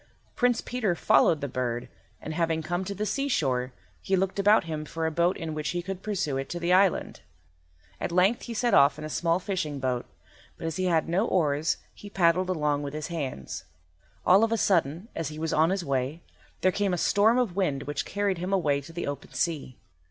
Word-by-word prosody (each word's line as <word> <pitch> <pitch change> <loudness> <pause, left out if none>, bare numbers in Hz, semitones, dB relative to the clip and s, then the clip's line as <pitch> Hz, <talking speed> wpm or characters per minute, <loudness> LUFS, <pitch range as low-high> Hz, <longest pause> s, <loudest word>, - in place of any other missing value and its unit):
Prince 245 -1 +2
Peter 220 -8 -1
followed 160 -1 +4
the 140 - -2
bird, 120 -2 -3 0.3
and, 155 - -6
having 165 -1 0
come 175 +4 -2
to 200 +1 -5
the 210 - -2
seashore, 155 - 0 0.3
he 190 - +1
looked 190 +1 -1
about 205 +2 +5
him 155 -2 -4
for 160 +1 -4
a 160 - 0
boat 170 +3 +1
in 160 -1 -4
which 155 0 -3
he 175 +1 -2
could 190 0 -5
pursue 190 -10 -1
it 135 0 -4
to 175 - -4
the 175 +1 +1
island. 185 - +2 0.8
At - - -3
length 185 +6 +3
he 235 - -6
set 240 +2 +1
off 140 +1 +6
in 155 - -6
a - - -5
small 165 +2 +1
fishing 180 -6 -3
boat, 130 -2 -2 0.5
but - - -7
as 165 +1 -3
he 185 - 0
had 165 -3 +2
no 190 +7 +1
oars 155 -3 +1 0.2
he 205 - -11
paddled 185 -1 +2
along 150 -5 0
with 145 0 -5
his 155 +2 -4
hands. 140 - -5 0.6
All 190 +4 +6
of 225 - +2
a 230 - +2
sudden, 170 -2 +1
as 165 - -3
he 150 +1 -7
was 160 0 -2
on 160 +2 +4
his 190 -2 -1
way, 140 +4 -2 0.4
there 185 - +4
came 205 +1 0
on - - +2
a - - -4
storm 215 +7 +3
of 235 -8 0
wind 150 -9 0
which 145 +1 -3
carried 200 -3 -1
him 180 +2 -3
away 150 -7 +2
to 140 - -12
the 170 +1 -4
open 145 -1 -6
sea. 150 -7 -2
170 Hz, 220 wpm, -27 LUFS, 150-195 Hz, 0.8 s, off